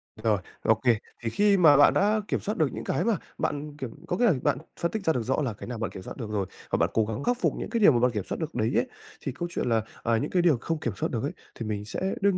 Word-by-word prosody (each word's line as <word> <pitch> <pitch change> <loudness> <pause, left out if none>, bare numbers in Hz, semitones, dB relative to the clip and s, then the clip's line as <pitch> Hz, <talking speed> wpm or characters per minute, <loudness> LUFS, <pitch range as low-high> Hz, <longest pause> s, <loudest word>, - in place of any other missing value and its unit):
Rồi, 110 -2 +1 0.2
ô 110 - +4
kê. 120 -3 +5 0.3
Thì 115 - 0
khi 205 - +3
mà 155 -6 +7
bạn 145 - +7
đã 210 +2 +3
kiểm - - 0
soát 210 - -3
được 155 - +3
những - - -5
cái 150 - 0
mà 225 -1 +2 0.2
bạn 145 0 -3
kiểm 130 -5 -4 0.2
có 180 - -1
nghĩa 245 - +3
rằng 175 - +3
bạn 145 -3 +2 0.2
phân 170 - 0
tích 220 -2 -3
ra 160 - +4
được 125 - -1
rõ 130 +6 0
là 125 -6 -1
cái 105 - -9
nào 125 -1 -4
bạn 110 -4 -3
kiểm 95 - -8
soát - - -8
được 115 -4 -5
rồi, 105 -2 -1 0.3
và - - +2
bạn - - +2
cố 110 - +3
gắng 110 +5 -4
khắc 245 +7 +1
phục - - +2
những - - -4
cái 235 - 0
điều 205 - +7
mà 120 - +2
bạn 125 +1 +3
kiểm 105 -4 -2
soát - - -2
được - - -4
đấy - - +1
ấy, - - +2 0.4
thì - - -1
câu 175 +7 -4
chuyện 125 - -1
là, 115 -1 +3 0.2
à 115 -1 +2
những - - -2
cái 180 - +3
điều 170 -6 +4
không 165 -1 -2
kiểm 120 -8 -2
soát - - -1
được 115 - -2
ấy, 145 - -1 0.3
thì 115 - -3
mình 105 -1 -3
sẽ 110 - -5 0.2
đương 200 -2 +3
135 Hz, 320 wpm, -27 LUFS, 115-175 Hz, 0.4 s, mà